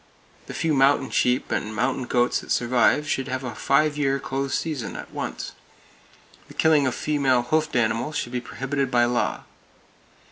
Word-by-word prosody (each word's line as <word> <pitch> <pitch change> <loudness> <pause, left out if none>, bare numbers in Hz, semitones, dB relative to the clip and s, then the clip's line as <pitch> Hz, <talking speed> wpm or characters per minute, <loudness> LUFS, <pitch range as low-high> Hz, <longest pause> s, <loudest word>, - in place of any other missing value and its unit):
The - - -7
few 165 -2 0
mountain 135 0 +3
sheep 125 +1 +1
and 110 +1 -2
mountain 125 +3 0
goats 120 0 +1
that - - -9
survive 125 +5 +2
should 135 -3 -1
have 130 0 -3
a 125 - -4
five 150 +1 +1
year 140 -1 +1
close 135 0 -2
season, 150 -8 -3
at - - -8
once. - - -5 1.0
The - - -14
killing 155 -4 +4
of 130 - -1
female 135 -5 +1
hoofed 155 +4 0
animals 120 +6 0
should 120 - -3
be 125 -1 -2
prohibited 135 +1 -3
by 120 -1 +3
law. 120 0 -1
135 Hz, 170 wpm, -24 LUFS, 125-145 Hz, 1.0 s, killing